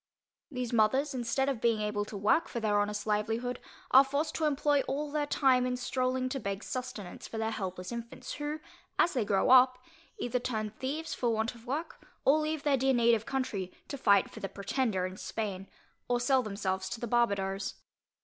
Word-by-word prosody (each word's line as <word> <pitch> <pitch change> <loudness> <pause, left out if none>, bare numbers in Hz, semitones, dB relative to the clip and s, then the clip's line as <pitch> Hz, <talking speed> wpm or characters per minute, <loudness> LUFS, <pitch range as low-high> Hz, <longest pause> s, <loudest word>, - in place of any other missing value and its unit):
These 250 -4 -4
mothers, 260 +6 +3
instead 255 +2 0
of 265 -5 -1
being 230 -2 +3
able 210 -1 -1
to 210 - -7
work 210 +11 +3
for 235 - -4
their 210 -2 +2
honest 210 0 -1
livelihood, 225 +4 -1 0.3
are 265 +1 +9
forced 285 +3 -1
to 320 - 0
employ 290 -1 +2
all 290 +2 -2
their 295 -1 0
time 260 -4 +3
in 250 0 -1
stroling 255 0 0
to 270 - -3
beg 200 -2 -4
sustenance 250 -8 -6
for 225 - -7
their 220 0 -1
helpless 185 -3 -4
infants 235 +2 -6
who, 295 +1 -3 0.4
as 350 - +3
they 250 -5 +1
grow 200 +3 +2
up, 255 0 +7 0.4
either 245 +1 -1
turn 220 -4 -2
thieves 285 +8 -4
for 240 - 0
want 220 +1 0
of 235 0 -16
work, 300 +6 -4 0.2
or 290 +3 +5
leave 310 -1 -2
their 285 -2 +3
dear 265 0 +2
native 235 -2 +3
country, 240 -9 -2 0.2
to - - -3
fight 200 -7 +4
for - - -9
the 195 - -4
Pretender 200 0 -1
in 185 0 -6
Spain, 195 -3 -4 0.4
or 245 0 +1
sell 260 +2 +3
themselves 190 -3 -2
to 230 - -5
the 240 - -3
Barbadoes. 200 -5 0
240 Hz, 195 wpm, -31 LUFS, 210-270 Hz, 0.4 s, are